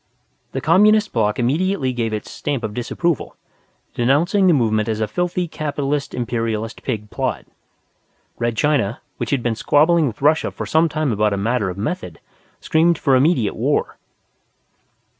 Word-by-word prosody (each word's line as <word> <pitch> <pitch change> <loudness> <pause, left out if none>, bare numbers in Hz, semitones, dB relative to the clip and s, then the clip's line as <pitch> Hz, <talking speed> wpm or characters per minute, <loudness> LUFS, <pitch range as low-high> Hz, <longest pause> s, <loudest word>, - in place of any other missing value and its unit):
The - - -2
Communist 210 +6 +4
Block 105 -3 +1
immediately 140 +2 0
gave 115 -2 -2
its 105 -1 -5
Stamp 140 -5 -3
of 110 -2 -3
Disapproval, 145 +7 -2 0.6
denouncing 165 +11 +2
the 175 - +5
movement 110 -4 +1
as 110 -1 -1
a 110 - 0
filthy 180 - -1
Capitalist 145 -2 -3
Imperialist 115 -2 -3
Pig 105 -5 -4
plot. 130 -8 -2 0.9
Red 120 -1 -1
China, 130 -7 +1 0.2
which 120 - -3
had 135 -4 0
been 120 - +1
squabbling 155 +7 +3
with 120 +2 -7
Russia 155 +2 +3
for - - -6
some 160 +1 +2
time 155 -3 -1
about 105 -1 +1
a - - -1
matter 110 0 0
of 90 - -6
method, 180 - -4 0.4
screamed 165 0 +2
for 135 -2 +2
immediate 130 - +2
war. - - -1
130 Hz, 155 wpm, -20 LUFS, 115-160 Hz, 0.9 s, the